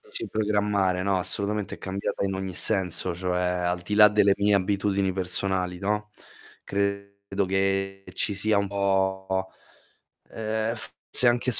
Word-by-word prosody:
Dici - - -7
programmare, 105 -3 +1
no, 100 0 +1
assolutamente 100 +2 -2
è - - -14
cambiata 100 +1 -3
in 95 -1 -1
ogni 95 -1 -4
senso, 90 -1 +1
cioè 90 0 -1
al 90 0 -1
di 105 +4 -3
là 105 0 +8
delle 100 -1 +4
mie 100 0 +2
abitudini 100 0 +1
personali, 90 0 0
no, 105 +2 -2 0.5
credo 100 0 -2
che 95 0 -1
ci 105 - 0
sia 105 +2 +2
un 100 0 -1
po 95 -1 0 0.8
ehm, 110 +1 -2
forse 120 +2 +2
anche 120 +1 +1
100 Hz, 140 wpm, -26 LUFS, 95-105 Hz, 0.8 s, là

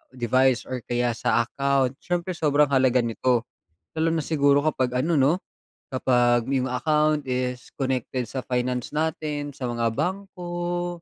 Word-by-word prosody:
device 130 +1 +2
or 130 -1 -3
kaya 120 0 +1
sa 120 +1 +2
account. 135 -1 +1
Siyempre 175 +1 -2
sobrang 150 -3 +2
halaga 130 -2 +3
nito, 115 +1 +1 0.5
lalo 160 +1 +1
na 160 - 0
siguro 145 -3 +3
kapag 130 -5 0
ano 170 - +1
'no, 140 +1 +4 0.6
kapag 120 -2 +2
'yong 130 -1 0
account 150 +3 +1
is 125 -1 -3
connected 130 -2 -2
sa 130 -2 -5
finance 125 +1 -2
natin, 150 -2 -2
sa 130 - -4
mga 120 -1 0
bangko 175 -2 -3
135 Hz, 140 wpm, -25 LUFS, 125-155 Hz, 0.6 s, no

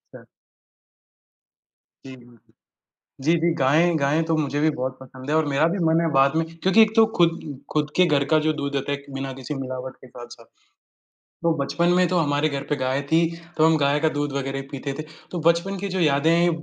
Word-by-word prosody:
अच्छा। - - -13 1.8
जी, 130 -1 -9
जी, 125 -2 -18
जी। 120 -2 -23 0.7
जी, 160 - +3
जी 170 +1 +2
गायें 160 +4 +2
गायें 145 +3 +1
तो 160 -1 0
मुझे 145 -1 -1
भी 155 - +3
बहुत 130 -2 -4
पसंद 130 +1 -10
है 155 - +2
और 160 - +2
मेरा 145 +2 +2
भी 180 +4 -2
मन 160 +1 +3
है 165 -1 0
बाद 135 +2 +3
में 165 - +2
क्योंकि 185 +6 +3
एक 220 -1 +2
तो 225 - +7
खुद 170 -1 +2 0.3
खुद 150 -1 0
के 180 - +5
घर 145 -4 +2
का 155 - +6
जो 155 - +3
दूध 140 0 -3
होता 140 +1 -2
है 140 - -2
एक, 140 - -18
बिना 135 0 -4
किसी 135 +3 -7
मिलावट 130 -1 -6
के - - -16
साथ-साथ। 120 -1 -12 1.0
तो 170 -1 +3
बचपन 170 +5 0
में 180 0 +3
तो 180 +1 0
हमारे 145 -1 +1
घर 140 -1 -4
पे 150 - +1
गाय 130 0 -1
थी, 165 - +4 0.4
तो 155 - +4
हम 160 0 +4
गाय 145 0 +1
का 160 0 +2
दूध 145 -1 -2
वगैरह 135 0 -3
ही 135 - -8
पीते 140 0 -5
थे, - - -3 0.3
तो 175 - -3
बचपन 175 +4 0
की 200 +2 -4
जो 185 - 0
यादें 150 0 +2
हैं 170 +1 +3
150 Hz, 225 wpm, -23 LUFS, 135-165 Hz, 1.8 s, तो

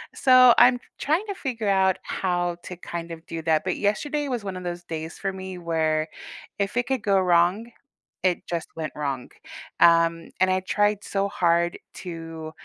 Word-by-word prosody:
So, 255 -2 +7
I'm 245 +1 +7
t - - -30 0.2
trying 325 +9 +1
to 400 - -2
figure 230 - -4
out 190 -1 +3
how 175 -2 -1
to, 180 - -7
kind 170 -1 -6
of 165 0 -9
do 165 -1 -5
that, 160 -1 +2
but 185 - -2
yesterday 290 +8 -1
was 245 -5 -3
one 190 -2 -5
of 180 - -7
those 175 0 -5
days 160 -1 -6
for 195 -1 -3
me, 190 -1 -7
where 160 -2 0 0.5
if 200 +4 -1
it 245 - +1
could 265 -4 -1
go 195 -2 +3
wrong, 180 +6 +2 0.5
it 180 -2 +1
just 170 -2 -3
went 155 -2 -4
wrong, 140 -4 -3 0.5
um, 165 0 +4
and 185 - +5
I 185 - +2
tried 205 +2 +1
so 200 0 -1
hard 170 -2 +1 0.2
to 165 -2 -7
180 Hz, 185 wpm, -25 LUFS, 165-205 Hz, 0.5 s, So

